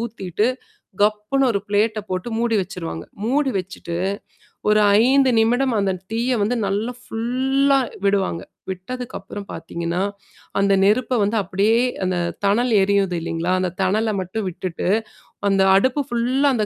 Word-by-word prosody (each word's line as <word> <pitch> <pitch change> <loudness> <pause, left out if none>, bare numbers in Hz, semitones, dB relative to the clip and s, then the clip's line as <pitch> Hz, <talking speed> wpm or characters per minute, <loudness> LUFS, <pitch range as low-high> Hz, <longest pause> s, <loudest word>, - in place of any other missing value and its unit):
ஊத்திட்டு, 210 -3 -2 0.6
கப்புன்னு 215 +6 +2
ஒரு 200 - 0
பிளேட்ட 210 +2 +1
போட்டு 185 +5 -2
மூடி 235 -2 +1
வச்சுருவாங்க. 80 - -6 0.2
மூடி 270 +4 +1
வச்சுட்டு 180 -2 -6 0.7
ஒரு 215 0 +5 0.3
5 270 +1 +4
நிமிடம் 245 +2 +2
அந்த 195 -1 +1 0.2
தீய 235 +3 0
வந்து 230 +4 0
நல்லா 210 +5 -1
ஃபுல்லா 260 +4 +1 0.3
விடுவாங்க. 195 -4 +1 0.3
விட்டதுக்கப்புறம் 200 0 -7
பார்த்தீங்கன்னா, 170 +2 -3 0.6
அந்த 200 0 +3
நெருப்ப 225 +5 +2
வந்து 205 +3 0
அப்படியே 200 +5 +2 0.2
அந்த 185 -1 0 0.3
தணல் 235 +5 +2
எரியுது 195 -2 +2
இல்லைங்களா? 165 +2 -2
அந்த 185 -1 0
தணல 215 +4 +1
மட்டும் 190 +3 -3
விட்டுட்டு, 175 0 -4 0.6
அந்த 195 -1 +3
அடுப்பு 260 +8 +3
ஃபுல்லா 250 +4 +2
அந்த 215 -2 +1
210 Hz, 130 wpm, -21 LUFS, 190-245 Hz, 0.7 s, ஒரு